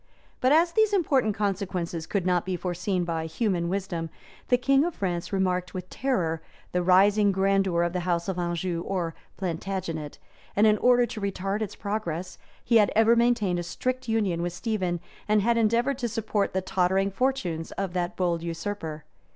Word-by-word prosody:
But 255 - +3
as 335 +3 +5
these 435 +1 +3
important 270 - +2
consequences 185 -5 -2
could 195 -4 -1
not 180 -1 +2
be 185 0 -2
foreseen 180 +1 -1
by 165 -2 -2
human 170 -1 -1
wisdom, 180 -4 -3 0.4
the 245 - +4
king 275 +2 +3
of 345 0 -2
France 175 -3 -2
remarked 185 -2 0
with 180 0 -6
terror 175 -12 -1 0.3
the 180 - +1
rising 200 +3 +5
grandeur 195 -2 +2
of 175 0 -1
the 180 - 0
house 175 0 -1
of 190 -2 -2
Anjou 175 0 -2
or 175 -3 -2 0.2
Plantagenet; 170 -4 -4 0.4
and 210 - +5
in 215 -1 +4
order 245 0 +5
to 220 -2 -7
retard 195 +1 -2
its 215 - -3
progress, 185 -4 -4 0.3
he 235 - +5
had 210 -2 +4
ever 225 +2 +5
maintained 230 -7 +2
a - - -3
strict 255 +8 -3
union 200 -7 +1
with 175 0 -2
Stephen, 185 -3 -2 0.3
and 210 -1 +3
had 235 +2 +3
endeavored 235 +4 +2
to 240 - -1
support 210 -2 -1
the 190 - 0
tottering 190 +1 +1
fortunes 195 -9 -1
of 195 -2 -3
that 180 +2 -2
bold 175 -2 0
usurper. 165 -2 -4
190 Hz, 175 wpm, -26 LUFS, 175-220 Hz, 0.4 s, as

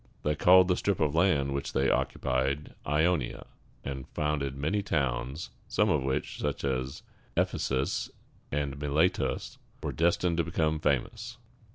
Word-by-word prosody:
They 75 - +2
called 90 +4 +6
the 90 - +3
strip 100 0 0
of 75 -2 +2
land 75 -6 +3
which 70 0 -3
they 65 0 +2
occupied 65 +2 0
Ionia, 75 -2 +1 0.4
and 65 -1 -5
founded 70 -3 -1
many 80 +9 0
towns, 65 -3 -2 0.2
some - - +2
of - - +2
which, 65 0 -2
such - - -2
as 65 +1 -2 0.3
Eph´e - - +1
sus 65 0 -1 0.4
and 70 -1 -2
Mi 75 - -2
le´tus, 80 +5 0 0.2
were - - -1
destined 85 +1 +1
to 85 - +3
become 80 -2 0
famous. 80 - -1
75 Hz, 150 wpm, -29 LUFS, 65-85 Hz, 0.4 s, called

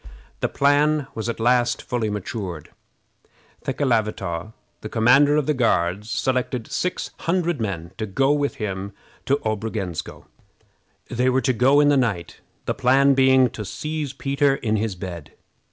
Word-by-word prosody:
The - - 0
plan 145 +1 +2
was 110 +1 -4
at 115 - -4
last 120 +1 +2
fully 120 -3 -2
matured. 100 -5 -5 0.9
Thekelavitaw, 110 - -1 0.3
the 110 - -6
commander 130 +7 +4
of 150 -2 +1
the 150 - +1
Guards, 105 -5 0
selected 125 -2 -1
six 180 - -2
hundred 170 -5 0
men 85 -5 -4
to 110 - -2
go 135 +8 +2
with 145 -1 -1
him 100 -2 -4 0.3
to 140 +1 +3
Obrogensko. 110 -5 -4 0.9
They 125 +2 +1
were 130 +1 +2
to 130 - +1
go 130 +5 +4
in 145 0 +5
the 145 - +4
night, 100 -10 -1 0.3
the - - 0
plan 135 +2 +4
being 130 -2 +4
to 105 - -6
seize 150 +8 -4
Peter 135 +1 +1
in 110 -4 -1
his 105 -2 -2
bed. 90 -4 -8
125 Hz, 150 wpm, -23 LUFS, 105-140 Hz, 0.9 s, in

